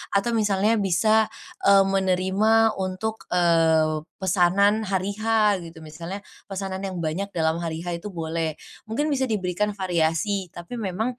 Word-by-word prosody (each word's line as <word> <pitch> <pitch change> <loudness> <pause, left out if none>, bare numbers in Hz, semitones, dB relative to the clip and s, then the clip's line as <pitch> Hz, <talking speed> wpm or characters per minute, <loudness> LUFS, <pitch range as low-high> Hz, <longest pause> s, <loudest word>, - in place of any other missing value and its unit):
atau 200 +4 +2
misalnya 210 0 +2
bisa, 215 +3 +3 0.4
eee, 195 0 +7
menerima 195 +4 +2
untuk, 190 +4 -4
eee, 160 -3 +3 0.2
pesanan 195 +3 +3
hari 190 +1 -1
H 215 -3 +2
gitu, 165 0 -11
misalnya 165 +6 -7 0.3
pesanan 190 -1 -4
yang 190 -2 -4
banyak 170 +6 -2
dalam 160 0 +1
hari 165 0 -4
H 175 -1 -3
itu 210 - -7
boleh, 160 -1 -2 0.3
mungkin 290 +7 0
bisa 265 -2 +1
diberikan 205 0 -1
variasi 180 +1 0
tapi 175 +7 -8
memang, 220 +4 -2
190 Hz, 140 wpm, -24 LUFS, 170-210 Hz, 0.4 s, eee